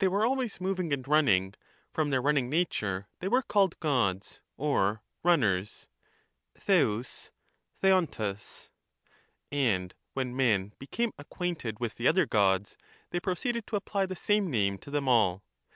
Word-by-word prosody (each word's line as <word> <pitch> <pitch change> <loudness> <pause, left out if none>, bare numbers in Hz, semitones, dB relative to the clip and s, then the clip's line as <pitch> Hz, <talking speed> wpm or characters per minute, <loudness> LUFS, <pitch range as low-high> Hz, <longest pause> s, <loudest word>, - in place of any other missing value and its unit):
were 200 +4 +2
always 255 -2 -1
movmg 185 -3 -2
and 135 -3 -1
runnmg, 110 -11 +3 0.4
from 155 -2 0
theu: 135 -2 +2
runnmg 140 -3 +2
nature 105 - -1
they 185 - -3
were 240 +6 +3
running 260 - -2
called 195 -4 +2
Gods 115 - 0 0.2
or 110 -7 +1 0.2
runners 105 - +1 0.7
(Oeov^, 125 - 0 0.5
Otovrag); 150 - 0 0.8
and 105 -11 0 0.2
when 130 -2 -3
men 115 -8 +3
be - - -11
about - - -30
they - - -8
came 235 +5 -1
acquainted 145 - -4
with 120 -2 -2
the 120 - 0
other 180 +1 +4
Gods, 100 -4 +1 0.4
they 175 - 0
proceeded 230 +6 -2
to - - -3
apply 200 -1 -1
9^0,, - - -10
the 185 - -4
same 205 +1 +1
name 100 -7 0
to - - -12
them 145 -1 -1
all. 105 -6 +3
140 Hz, 155 wpm, -29 LUFS, -, 0.8 s, other